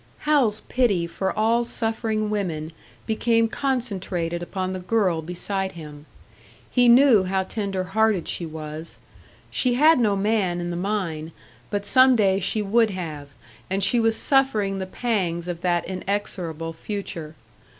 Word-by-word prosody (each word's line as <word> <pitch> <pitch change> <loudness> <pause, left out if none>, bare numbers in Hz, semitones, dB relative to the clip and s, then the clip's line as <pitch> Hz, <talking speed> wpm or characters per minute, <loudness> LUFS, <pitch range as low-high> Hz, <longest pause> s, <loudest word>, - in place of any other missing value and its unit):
Hal's 270 -9 +2
pity 210 -9 +1
for 180 +3 -2
all 230 +2 +3
suffering 225 -2 -2
women 165 -7 -2 0.3
became 230 +1 +2
concentrated 195 -10 -2
upon 185 +1 -3
the 185 - -4
girl 185 -3 +1
beside 190 +3 -3
him. 150 -2 -11 0.6
He 245 -1 +4
knew 240 -5 +6
how 190 +1 0
tenderhearted 195 0 0
she - - -2
was. 155 +1 -7 0.5
She 250 -2 +1
had 305 +3 +5
no 210 -4 +2
man 195 -3 0
in 175 0 -3
the - - -3
mine, 170 -5 -3 0.4
but 205 -1 -2
some 255 +1 +6
day 195 -4 +3
she 210 +3 0
would 220 +3 +3
have, 155 -7 -6 0.4
and 195 +1 0
she 240 - +4
was 225 -1 +2
suffering 215 -8 +2
the 190 - -4
pangs 185 -6 -2
of 175 -1 -4
that 175 -1 +1
inexorable 180 -4 -3
future. 165 -4 -6
195 Hz, 140 wpm, -24 LUFS, 175-225 Hz, 0.6 s, knew